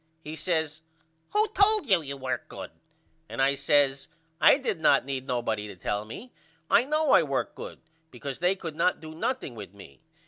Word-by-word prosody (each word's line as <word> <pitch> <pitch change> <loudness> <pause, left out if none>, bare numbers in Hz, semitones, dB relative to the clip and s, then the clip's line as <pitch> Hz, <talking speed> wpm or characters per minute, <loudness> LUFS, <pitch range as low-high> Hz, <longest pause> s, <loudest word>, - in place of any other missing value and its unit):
He 155 +1 -6
says 160 -1 -1 0.5
Who 425 +2 +3
told 425 -1 +4
you 190 -8 +4
you 140 -2 -6
worked 130 -1 -4
good - - -8 0.6
and - - -7
I 135 +1 +4
says 140 0 +2 0.3
I 160 - +7
did 265 - -2
not 155 - +4
need 135 -1 -4
nobody 110 -4 -1
to 100 - -9
tell 105 +4 -3
me. 215 - -10 0.4
I 230 - +6
know 305 0 +1
I - - +7
worked 140 -4 -2
good - - -9 0.3
because 135 +1 -6
they 180 +3 +2
could 165 -5 -7
not 180 - +2
do 155 0 -9
nothing 205 - -2
with 100 -4 -10
me. 70 -9 -14
150 Hz, 185 wpm, -27 LUFS, 130-190 Hz, 0.6 s, I